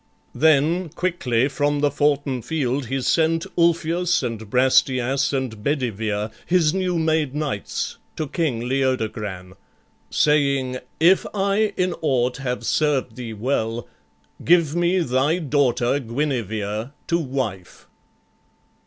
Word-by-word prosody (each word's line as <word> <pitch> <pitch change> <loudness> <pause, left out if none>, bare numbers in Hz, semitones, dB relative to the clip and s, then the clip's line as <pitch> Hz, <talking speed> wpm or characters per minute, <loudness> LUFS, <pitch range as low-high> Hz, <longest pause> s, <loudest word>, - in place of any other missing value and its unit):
Then 160 +3 +3
quickly 145 -8 0
from 145 0 0
the 145 -1 +2
foughten 145 -3 0
field 135 -3 -2
he 135 +2 -2
sent 165 +4 +2
Ulfius, 170 0 +2
and 110 -3 -4
Brastias, 130 +1 +2
and 130 -6 -3
Bedivere, 110 -6 -1 0.2
His 170 -3 +3
new 185 -2 0
made 160 -4 0
knights, 145 -9 -3 0.2
to 155 - -3
King 135 -6 -1
Leodogran, 110 -8 -2 0.6
Saying, 140 -4 +2 0.2
"If 175 +4 +4
I 200 +2 +1
in 180 -1 +1
aught 125 -5 +1
have 125 -2 -3
served 140 -6 +1
thee 120 -3 -6
well, 115 0 -2 0.6
Give 165 -2 +3
me 175 +2 +2
thy 135 +3 +1
daughter 140 -5 +1
Guinevere 115 -3 -3
to 170 - +1
wife." 125 - -4
140 Hz, 115 wpm, -22 LUFS, 120-160 Hz, 0.6 s, If